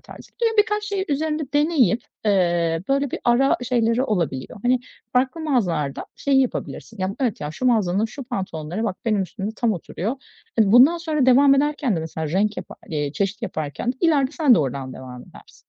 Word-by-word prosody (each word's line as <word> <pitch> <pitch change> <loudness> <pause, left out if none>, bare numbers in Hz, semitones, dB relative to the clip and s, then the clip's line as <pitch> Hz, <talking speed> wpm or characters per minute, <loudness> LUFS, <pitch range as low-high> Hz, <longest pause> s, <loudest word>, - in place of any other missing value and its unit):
tarzı. - - -14
Böyle 450 -1 +2
birkaç 420 0 +2
şeyi 400 -2 -2
üzerinde 305 +1 -1
deneyip, 290 - +3 0.2
eee, 175 -4 +2
böyle 275 0 +1
bir - - -4
ara 245 +3 +3
şeyleri 235 0 +1
olabiliyor. 170 - -2
Hani 250 0 +2 0.3
farklı 260 +5 +1
mağazalarda 180 - -1
şeyi 275 -1 +2
yapabilirsin. 230 -3 -4
Ya, 185 +1 -2
evet, 245 -6 -1
ya, 150 - -4
şu 210 +11 -3
mağazanın 215 -4 +2
şu 265 +4 -9
pantolonları 190 - -4
bak 195 -4 -2
benim 215 -3 +1
üstümde 195 +3 -5
tam 235 -2 +1
oturuyor. 200 - -4 0.4
Hani 210 -3 +4
bundan 275 +9 +7
sonra 310 -5 0
devam 275 +2 +6
ederken 285 -6 +1
de - - -1
mesela 160 0 -4
renk 205 +6 0
yapa - - -7
eee, 145 -2 -2
çeşit 200 +2 -2
yaparken 155 - -3
de - - -25
ileride 290 -5 +3
sen 295 -7 +4
de - - +3
oradan 135 -1 -3
devam 125 -1 -9
edersin. - - -18
230 Hz, 185 wpm, -22 LUFS, 175-275 Hz, 0.4 s, bundan